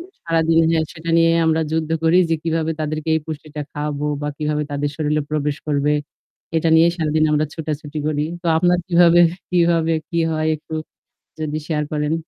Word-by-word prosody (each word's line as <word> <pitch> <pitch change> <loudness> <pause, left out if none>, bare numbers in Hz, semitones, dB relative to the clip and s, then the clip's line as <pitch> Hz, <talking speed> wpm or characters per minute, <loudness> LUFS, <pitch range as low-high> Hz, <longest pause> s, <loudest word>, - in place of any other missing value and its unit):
এ - - -7 0.2
সারাদিন 165 -1 +2
হ্যাঁ, 160 -1 +2
সেটা 165 0 -6
নিয়ে 165 0 +5 0.2
আমরা 160 0 +2
যুদ্ধ 160 -1 -1
করি 165 +2 +4
যে - - +3
কিভাবে 160 -1 -1
তাদেরকে 155 +1 -3
এই - - -1
পুষ্টিটা 155 -1 -6
খাওয়াবো 150 0 -3 0.2
বা 145 - -1
কিভাবে 150 -1 -1
তাদের 145 0 -2
শরীরে 150 -1 0
প্রবেশ 150 -1 -1
করবে। 145 0 +1 0.6
এটা 160 +1 +2
নিয়ে 165 +1 +6
সারাদিন 155 -2 +1
আমরা 150 0 +2
ছুটাছুটি 155 -1 -5
করি। 150 -1 0 0.2
তো - - -5
আপনার 180 +1 +3
কিভাবে 175 -1 +6 0.3
কিভাবে 170 -2 +2 0.2
কি 170 - -1
হয়? 155 0 -1
একটু 155 +1 -9 0.7
যদি 155 -1 -2
শেয়ার 150 -2 0
করেন। 150 0 -1
155 Hz, 175 wpm, -20 LUFS, 150-165 Hz, 0.7 s, নিয়ে